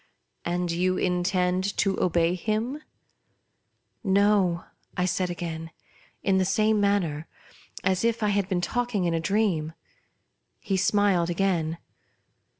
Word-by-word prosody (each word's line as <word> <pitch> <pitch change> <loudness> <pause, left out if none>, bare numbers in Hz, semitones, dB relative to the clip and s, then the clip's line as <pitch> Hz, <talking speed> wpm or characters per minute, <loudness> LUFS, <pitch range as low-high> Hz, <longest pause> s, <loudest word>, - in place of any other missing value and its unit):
" - - -49
And 175 -1 -1
you 185 +2 +1
intend 180 +1 0
to 195 -2 +1
obey 170 -1 +2
him 220 - -2 0.4
?" - - -47
" - - -48 0.2
No," 195 -5 +3 0.3
1 180 - +2
said 180 0 0
again, 165 -2 -5 0.5
in 190 -1 +3
the - - +3
same 215 +2 +2
manner, 175 -7 0 0.6
as 185 +1 +1
if 230 -1 +1
I 210 - +2
had 200 -1 0
been 180 -2 0
talking 240 -2 -1
in 170 - +1
a 165 - +1
dream. 175 -4 0 0.9
He 200 -3 -2
smiled 190 -3 +2
again. 170 -3 0
185 Hz, 140 wpm, -26 LUFS, 175-205 Hz, 0.9 s, No